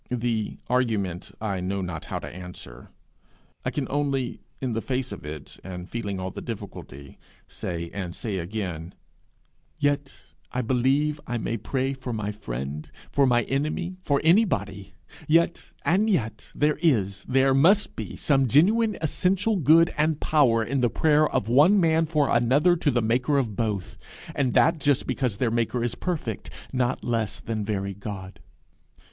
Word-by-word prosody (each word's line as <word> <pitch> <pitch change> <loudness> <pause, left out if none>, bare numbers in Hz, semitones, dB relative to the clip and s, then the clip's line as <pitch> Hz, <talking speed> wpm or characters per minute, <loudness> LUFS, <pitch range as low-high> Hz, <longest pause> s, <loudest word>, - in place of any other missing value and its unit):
The 115 -3 -1
argument 105 -8 0
I 100 -4 -2
know 95 +2 -2
not 85 -4 -5
how - - -4
to - - -6
answer. 90 -9 -10 0.7
I - - 0
can 145 - -2
only, 135 -3 -1 0.2
in 130 -3 -2
the 115 - -1
face 130 0 -2
of - - -7
it, 75 -1 -8
and 90 -1 -7
feeling 100 -4 -4
all 95 0 -4
the - - -7
difficulty, 95 - -8 0.3
say, 85 -1 -5
and 90 -4 -5
say 100 -5 -3
again, 90 -2 -5 0.8
'Yet 145 -1 -1 0.3
I 125 - -1
believe 135 +5 +1
I 120 - -1
may 115 0 -2
pray 130 +5 -1
for 130 -2 -6
my 105 -1 -2
friend 70 - -5 0.2
for 140 -1 +3
my 120 -1 +3
enemy 155 +8 -2
for 140 -6 +1
anybody! 105 - +2 0.3
Yet 170 +2 +2 0.2
and 200 +6 +3
yet, 110 - -1
there 150 +1 +1
is, 105 - +1
there 135 +1 +3
must 190 +10 +4
be - - -6
some 135 -3 +2
genuine, 210 - +4
essential 190 +7 +1
good 165 0 +5
and 155 0 +2
power 125 -7 +3
in 135 +3 -1
the 120 - +3
prayer 155 +4 +3
of 100 - -1
one 150 - +6
man 160 -2 +3
for 150 -3 +2
another 135 +9 +4
to 165 -3 +1
the 120 -4 +1
maker 125 +6 +2
of 115 -7 0
both 105 -4 -2 0.3
and 130 -4 0
that 165 0 +4
just 145 -2 +2
because 125 -6 -1
their 120 0 +1
maker 115 +1 0
is 120 - -1
perfect, 155 - -4 0.2
not 125 0 0
less 115 -3 -1
than 110 -2 -3
very 100 -1 -2
God.' 95 -1 -8
125 Hz, 165 wpm, -25 LUFS, 100-145 Hz, 0.8 s, one